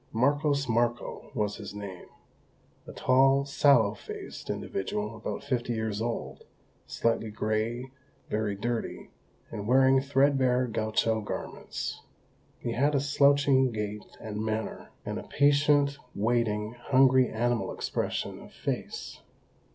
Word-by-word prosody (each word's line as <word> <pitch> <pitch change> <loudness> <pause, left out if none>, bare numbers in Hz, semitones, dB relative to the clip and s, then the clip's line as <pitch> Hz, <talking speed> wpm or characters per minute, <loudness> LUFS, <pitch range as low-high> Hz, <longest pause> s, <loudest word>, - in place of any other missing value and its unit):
Marcos 140 +4 +2
Marcó 120 0 -1
was 105 -3 -1
his 105 -1 -8
name; 100 -3 -8 0.8
a - - -7
tall, 135 +2 +4
sallow 140 -7 +4
faced 110 - -9
individual 105 +3 -3
about 110 - -5
fifty 125 -3 -1
years 110 -2 -2
old, 115 0 -4 0.4
slightly 115 -1 0
grey, 110 +4 -2 0.4
very 105 -1 -1
dirty, 115 +3 -3 0.4
and 105 -2 -5
wearing 130 +1 +5
threadbare 135 -2 +3
gaucho 110 -1 0
garments. 105 - -5 0.6
He - - -4
had 145 +5 +2
a - - +4
slouching 140 -2 +4
gait 105 -1 -5
and 105 0 -4
manner, 110 0 -3 0.2
and - - -3
a - - -10
patient, 145 0 +3 0.2
waiting, 110 -1 0
hungry 130 +1 +4
animal 120 +1 0
expression - - -3
of - - -13
face. - - -5
120 Hz, 120 wpm, -28 LUFS, 110-135 Hz, 0.8 s, wearing